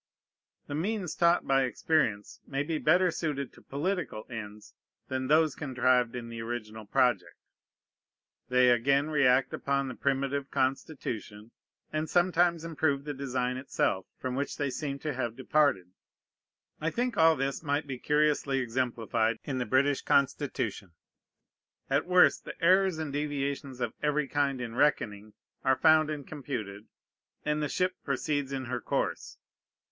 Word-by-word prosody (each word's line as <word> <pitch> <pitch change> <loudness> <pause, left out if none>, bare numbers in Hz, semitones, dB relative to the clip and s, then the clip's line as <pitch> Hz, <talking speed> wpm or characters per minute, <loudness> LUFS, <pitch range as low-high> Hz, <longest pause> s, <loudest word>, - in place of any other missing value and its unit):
The - - -7
means 180 +2 -2
taught 170 0 +3
by 135 0 +3
experience 130 -5 0
may 140 0 -1
be 155 +1 -2
better 180 +3 +4
suited 145 -6 -3
to - - -17
political 145 - -3
ends 105 -2 -8 0.4
than 130 0 -2
those 155 0 +4
contrived 130 -4 +1
in 120 -1 -5
the 115 -1 -6
original 110 -2 -6
project. 115 -9 +1 1.1
They 125 0 +5
again 140 +5 +2
react 135 -3 +3
upon 140 -1 -1
the - - -5
primitive 140 +1 -1
constitution, 130 -5 -3 0.4
and 155 +1 -1
sometimes 175 -2 +2
improve 150 -4 0
the 145 0 -4
design 130 -2 -2
itself, 115 -7 -1
from 130 -1 -4
which 140 +2 -3
they 140 -2 -1
seem 140 +2 -3
to 150 - -1
have 120 -3 -3
departed. 130 -9 +1 0.9
I 160 - 0
think 245 +6 -1
all 160 0 +5
this 135 0 -2
might 145 0 -1
be 135 -3 -6
curiously 150 -2 +1
exemplified 115 -3 0
in 135 -3 -3
the 125 - -2
British 135 +4 +2
Constitution. 120 - 0 1.0
At 140 +5 +2
worst, 180 0 +5
the - - -9
errors 185 0 +4
and 155 -3 -4
deviations 140 -2 -3
of 120 -2 -2
every 150 -1 +1
kind 140 -2 0
in 115 -2 -5
reckoning 110 -6 0 0.3
are 130 - +4
found 155 -1 +5
and 150 -3 -5
computed, 110 -8 -6 0.6
and 150 0 0
the 150 - -1
ship 185 0 0
proceeds 140 0 -1
in 135 -1 -3
her 125 - -3
course. - - -2
140 Hz, 145 wpm, -29 LUFS, 125-150 Hz, 1.1 s, They